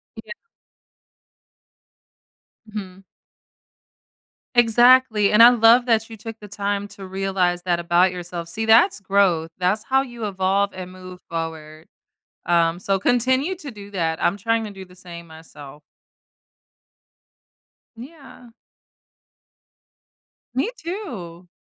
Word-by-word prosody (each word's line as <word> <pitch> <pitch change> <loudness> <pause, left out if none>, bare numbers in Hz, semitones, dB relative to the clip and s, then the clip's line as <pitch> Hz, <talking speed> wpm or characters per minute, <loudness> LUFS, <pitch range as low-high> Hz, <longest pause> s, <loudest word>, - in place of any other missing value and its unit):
Yeah. - - -11 2.3
Mhm. 195 -3 -9 1.5
Exactly. 240 -2 +4
And 210 +2 +7
I 240 - +10
love 240 0 +5
that 225 -2 +1
you 225 - -10
took 225 +1 -9
the 210 - -11
time 205 -1 -3
to 200 -1 -11
realize 190 -2 -1
that 175 -1 0
about 175 +2 +2
yourself. 175 -1 -7
See, 220 +6 -4
that's 225 - +4
growth. 190 -5 +1
That's 190 +4 0
how 265 0 +1
you 240 -4 -7
evolve 195 0 0
and 185 -1 -8
move 185 0 -12
forward, 160 -1 -6 0.6
um, 170 0 +2
so 195 0 0
continue 260 - +1
to 305 -6 -9
do 205 -3 -12
that. 165 -4 -2
I'm 175 - +1
trying 230 +1 -1
to 215 - -7
do 195 -1 -10
the 180 0 -19
same 170 -2 -11
myself. 150 -3 -13 2.1
Yeah. 265 -1 -13 2.0
Me 265 - -1
too. 225 - -8
200 Hz, 115 wpm, -21 LUFS, 175-230 Hz, 2.3 s, I